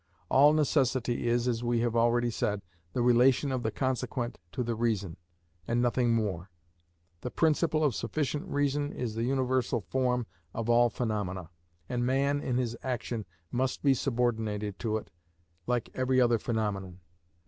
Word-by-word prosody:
All 145 Hz, +3 st, +6 dB
necessity 130 Hz, -5 st, +1 dB
is, 120 Hz, +1 st, +2 dB
as 120 Hz, -1 st, 0 dB
we 120 Hz, -1 st, +1 dB
have 120 Hz, -1 st, 0 dB
already 120 Hz, +1 st, +3 dB
said, 105 Hz, -2 st, -1 dB, 0.3 s
the 120 Hz, -, +1 dB
relation 125 Hz, +3 st, +4 dB
of 130 Hz, -1 st, -1 dB
the 110 Hz, -, 0 dB
consequent 125 Hz, -1 st, -2 dB
to 125 Hz, -, -2 dB
the 120 Hz, 0 st, -1 dB
reason, 110 Hz, -7 st, -1 dB, 0.5 s
and 120 Hz, +1 st, +1 dB
nothing 120 Hz, 0 st, +2 dB
more. 100 Hz, -5 st, -2 dB, 0.7 s
The 125 Hz, -, -3 dB
principle 155 Hz, +1 st, +2 dB
of 145 Hz, -4 st, +3 dB
sufficient 145 Hz, -, -2 dB
reason 145 Hz, -2 st, 0 dB
is 120 Hz, -3 st, -4 dB
the 115 Hz, +1 st, -1 dB
universal 130 Hz, -2 st, +1 dB
form 125 Hz, +2 st, 0 dB, 0.3 s
of 115 Hz, +1 st, 0 dB
all 120 Hz, 0 st, +5 dB
phenomena, 100 Hz, -7 st, -3 dB, 0.4 s
and 120 Hz, -1 st, -1 dB
man 140 Hz, +3 st, +1 dB
in 125 Hz, -3 st, -1 dB
his 120 Hz, -2 st, -1 dB
action 120 Hz, -4 st, -3 dB, 0.2 s
must 130 Hz, +1 st, -1 dB
be 140 Hz, -2 st, +5 dB
subordinated 110 Hz, -6 st, -1 dB
to 110 Hz, -2 st, 0 dB
it 110 Hz, -, -9 dB, 0.6 s
like 120 Hz, -2 st, -1 dB
every 130 Hz, 0 st, +2 dB
other 120 Hz, -2 st, +4 dB
phenomenon. 100 Hz, -5 st, -2 dB
120 Hz, 155 wpm, -29 LUFS, 115-130 Hz, 0.7 s, All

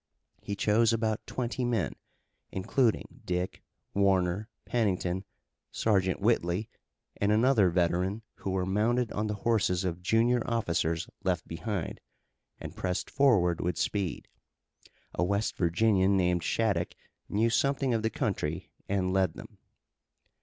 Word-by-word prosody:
He 100 Hz, -, -4 dB
chose 110 Hz, +3 st, +3 dB
about 110 Hz, -1 st, -1 dB
twenty 125 Hz, 0 st, -2 dB
men, 115 Hz, -, 0 dB, 0.6 s
including 110 Hz, +5 st, 0 dB
Dick, 90 Hz, 0 st, -2 dB, 0.3 s
Warner, 95 Hz, +1 st, +2 dB, 0.2 s
Pennington, 95 Hz, -5 st, 0 dB, 0.4 s
Sergeant 95 Hz, -4 st, +1 dB
Whitley, 100 Hz, -2 st, +1 dB, 0.5 s
and 100 Hz, +1 st, +1 dB
another 110 Hz, -3 st, +4 dB
veteran 90 Hz, +4 st, 0 dB
who -, -, -4 dB
were 95 Hz, -1 st, 0 dB
mounted 110 Hz, +5 st, +1 dB
on 105 Hz, +1 st, -1 dB
the 105 Hz, -, -2 dB
horses 100 Hz, -6 st, +2 dB
of 90 Hz, -1 st, -3 dB
junior 115 Hz, +5 st, +3 dB
officers 85 Hz, -7 st, 0 dB, 0.2 s
left 90 Hz, -3 st, 0 dB
behind, 90 Hz, +1 st, -4 dB, 0.6 s
and -, -, -8 dB
pressed 90 Hz, -1 st, -2 dB
forward 100 Hz, -, +3 dB
with 90 Hz, -2 st, -1 dB
speed. 100 Hz, -6 st, -2 dB, 0.9 s
A -, -, 0 dB
West 100 Hz, +4 st, 0 dB
Virginian 95 Hz, +2 st, +3 dB
named 90 Hz, -1 st, +2 dB
Shattuck 100 Hz, -3 st, 0 dB, 0.3 s
knew 115 Hz, +3 st, +2 dB
something 140 Hz, 0 st, +1 dB
of 115 Hz, -, +1 dB
the 110 Hz, -, +1 dB
country, 90 Hz, -, -2 dB, 0.2 s
and 95 Hz, -2 st, 0 dB
led 95 Hz, -4 st, +2 dB
them. -, -, -12 dB
100 Hz, 125 wpm, -29 LUFS, 90-115 Hz, 0.9 s, another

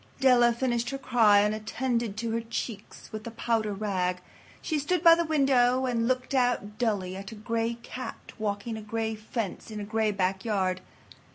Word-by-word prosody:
Della 245 Hz, -3 st, +5 dB
finished 240 Hz, 0 st, -1 dB
her 275 Hz, -, -3 dB
cry 220 Hz, -6 st, +5 dB
and 210 Hz, +1 st, +2 dB
attended 225 Hz, 0 st, -2 dB
to 230 Hz, 0 st, -2 dB
her 230 Hz, +1 st, 0 dB
cheeks 225 Hz, -2 st, -6 dB
with 215 Hz, -1 st, -6 dB
the 230 Hz, -, -5 dB
powder 225 Hz, -2 st, -1 dB
rag. 190 Hz, -3 st, -1 dB, 0.4 s
She 310 Hz, -3 st, -1 dB
stood 330 Hz, +4 st, 0 dB
by 335 Hz, -1 st, +10 dB
the 340 Hz, 0 st, +2 dB
window 260 Hz, -4 st, +3 dB
and 230 Hz, -2 st, 0 dB
looked 255 Hz, +1 st, -1 dB
out 245 Hz, -5 st, 0 dB
dully 200 Hz, -6 st, 0 dB
at 195 Hz, +1 st, -7 dB
a -, -, -8 dB
gray 230 Hz, +2 st, -1 dB
cat 255 Hz, -, -7 dB
walking 215 Hz, +1 st, -2 dB
a -, -, -6 dB
gray 220 Hz, +1 st, -2 dB
fence 215 Hz, -1 st, -5 dB
in 215 Hz, -1 st, -6 dB
a -, -, -4 dB
gray 220 Hz, +1 st, 0 dB
backyard. 190 Hz, -1 st, 0 dB
225 Hz, 180 wpm, -28 LUFS, 210-245 Hz, 0.4 s, by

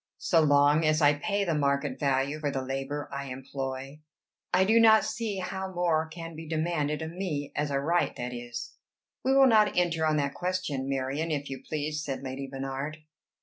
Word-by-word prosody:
So 165 Hz, -3 st, +3 dB
long 145 Hz, +1 st, +4 dB
as 155 Hz, 0 st, +3 dB
I 145 Hz, -2 st, +5 dB
pay 200 Hz, +7 st, -1 dB
the 170 Hz, -4 st, 0 dB
market 140 Hz, -2 st, 0 dB
value 140 Hz, +1 st, 0 dB
for 150 Hz, -2 st, -1 dB
the 135 Hz, -1 st, -2 dB
labor 135 Hz, +2 st, -3 dB
I 140 Hz, 0 st, -4 dB
employ, 135 Hz, +2 st, -6 dB, 0.5 s
I 190 Hz, -, +4 dB
do 220 Hz, +4 st, +4 dB
not 220 Hz, -1 st, +7 dB
see 220 Hz, -3 st, -3 dB
how 190 Hz, +1 st, -4 dB
more 170 Hz, -3 st, +1 dB
can 165 Hz, 0 st, -8 dB
be 160 Hz, +1 st, -8 dB
demanded 155 Hz, -1 st, -1 dB
of 160 Hz, -, -5 dB
me 165 Hz, -6 st, -3 dB
as 145 Hz, 0 st, 0 dB
a 140 Hz, -1 st, 0 dB
right, 170 Hz, +5 st, +1 dB
that 125 Hz, 0 st, -4 dB
is." 120 Hz, +5 st, -7 dB, 0.5 s
"We 265 Hz, +1 st, +3 dB
will 275 Hz, 0 st, +7 dB
not 215 Hz, -6 st, +4 dB
enter 170 Hz, -2 st, +2 dB
on 155 Hz, -1 st, +2 dB
that 140 Hz, -1 st, 0 dB
question, 175 Hz, -7 st, -2 dB
Marion, 135 Hz, +4 st, -1 dB
if 145 Hz, -3 st, -2 dB
you 135 Hz, -, -6 dB
please," 150 Hz, 0 st, -3 dB
said 135 Hz, -1 st, -4 dB
Lady 135 Hz, +1 st, -5 dB
Bernard. 135 Hz, +3 st, -5 dB
150 Hz, 190 wpm, -28 LUFS, 140-170 Hz, 0.5 s, not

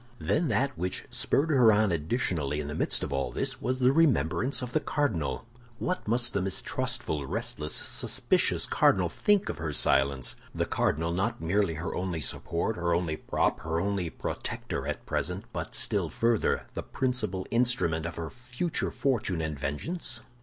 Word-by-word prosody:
Then 155 Hz, +7 st, +1 dB
that 135 Hz, +4 st, +1 dB
which 90 Hz, +1 st, -2 dB
spurred 155 Hz, +3 st, +1 dB
her 125 Hz, -6 st, +6 dB
on 105 Hz, -1 st, +3 dB
additionally 80 Hz, -, 0 dB
in 75 Hz, -, -3 dB
the 75 Hz, -, -4 dB
midst -, -, +1 dB
of -, -, -3 dB
all 70 Hz, 0 st, -1 dB
this 135 Hz, 0 st, -1 dB
was 130 Hz, -1 st, 0 dB
the 130 Hz, 0 st, +4 dB
remembrance 130 Hz, -, +2 dB
of 120 Hz, -, -5 dB
the 155 Hz, -, +3 dB
cardinal. 85 Hz, -, -1 dB, 0.3 s
What 180 Hz, -1 st, -2 dB
must 120 Hz, +2 st, +2 dB
the 100 Hz, -, +1 dB
mistrustful, 80 Hz, -5 st, -1 dB
restless, 75 Hz, +3 st, -2 dB
suspicious -, -, +2 dB
cardinal -, -, +3 dB
think 205 Hz, -1 st, +2 dB
of -, -, -4 dB
her 80 Hz, -2 st, -2 dB
silence—the 70 Hz, -2 st, +1 dB
cardinal, 80 Hz, +3 st, 0 dB
not 100 Hz, +6 st, -1 dB
merely 85 Hz, +1 st, +1 dB
her 85 Hz, +3 st, -4 dB
only 90 Hz, -2 st, -2 dB
support, 85 Hz, -, -2 dB
her 85 Hz, -1 st, +1 dB
only 85 Hz, -3 st, 0 dB
prop, -, -, 0 dB
her 80 Hz, +1 st, -1 dB
only 95 Hz, -2 st, -1 dB
protector -, -, -4 dB
at -, -, -4 dB
present, -, -, -2 dB
but -, -, -4 dB
still -, -, +1 dB
further, 115 Hz, -1 st, +1 dB
the -, -, -3 dB
principal 110 Hz, -8 st, -2 dB
instrument 115 Hz, -10 st, +1 dB
of 85 Hz, -, -6 dB
her 80 Hz, -2 st, -5 dB
future 125 Hz, +7 st, -2 dB
fortune 120 Hz, -, 0 dB
and 80 Hz, -3 st, -3 dB
vengeance? 120 Hz, -, -3 dB
95 Hz, 165 wpm, -29 LUFS, 80-125 Hz, 0.3 s, her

